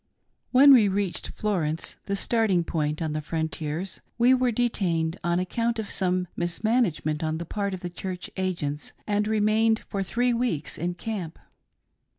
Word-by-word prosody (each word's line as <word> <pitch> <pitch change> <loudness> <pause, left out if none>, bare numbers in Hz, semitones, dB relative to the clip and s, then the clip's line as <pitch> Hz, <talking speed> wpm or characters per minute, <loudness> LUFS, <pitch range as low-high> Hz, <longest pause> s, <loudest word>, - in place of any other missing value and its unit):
When 275 +2 +8
we 225 -6 +6
reached 195 -2 -1
Florence 170 -7 -2
— - - -44
the 200 - 0
starting 200 -4 +2
point 155 -1 -1
on 155 -1 -2
the 155 - -2
Frontiers 160 +2 -3
— - - -45
we 245 +2 +5
were 255 -1 +2
detained 180 -8 0
on 175 0 +1
account 230 +6 -1
of 220 -2 -3
some 180 -1 +1
mismanage 195 +2 0
ment 155 0 -1
on 155 0 -1
the 170 - -5
part 200 +2 -2
of 180 - -10
the 175 - -4
Church 180 0 -5
Agents, 170 -6 -2
and 210 0 0
remained 220 +1 +3
for 200 - -4
three 240 +6 +1
weeks 230 - -1
in 175 +2 -2
camp. 185 -5 -5
190 Hz, 170 wpm, -26 LUFS, 165-220 Hz, -, When